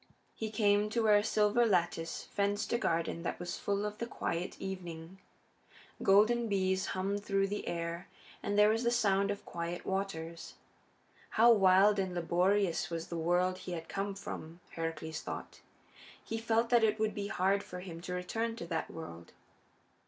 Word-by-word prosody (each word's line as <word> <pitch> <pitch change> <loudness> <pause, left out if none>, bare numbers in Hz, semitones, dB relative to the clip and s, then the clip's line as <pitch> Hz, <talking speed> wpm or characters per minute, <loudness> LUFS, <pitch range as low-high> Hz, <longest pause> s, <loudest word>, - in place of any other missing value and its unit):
He 220 - -4
came 210 -1 +2
to 230 +1 0
where 210 -1 +6
a 205 - +2
silver 210 +3 +3
lattice 175 -6 0
fenced 205 +2 -1
a 235 - +2
garden 165 -2 0
that 170 - -3
was 175 0 -4
full 200 0 -1
of 210 0 -5
the 235 - -3
quiet 175 -6 -3
of - - -18
evening. 180 -2 -6 0.8
Golden 220 +4 +4
bees 190 -2 +1
hummed 200 +2 -1
through 195 -1 +1
the 205 - -4
air, 170 0 -3 0.3
and 205 0 -1
there 210 0 +7
was 225 +1 +1
the 235 - +3
sound 200 -4 +2
of 200 0 -4
quiet 170 +1 -5
waters. 170 -4 -4 0.8
How 235 +2 +8
wild 200 0 +5
and 185 -2 -1
laborious 180 +2 +1
was 165 -1 -4
the 170 - -4
world 180 +3 +1
he 180 - -6
had 165 -1 -5
come 200 0 -3
from, 170 -4 -7
Heracles 165 -1 -4
thought! - - -7 0.6
He 225 - -4
felt 230 +1 +1
that 240 -2 +5
it 220 -1 +3
would 215 -1 +1
be 205 -2 -3
hard 195 +1 +1
for 180 -2 -8
him 170 -3 -8
to 180 +1 -5
return 225 +6 -2
to 170 - -6
that 165 -2 -3
world. 85 - -9
195 Hz, 175 wpm, -32 LUFS, 170-210 Hz, 0.8 s, How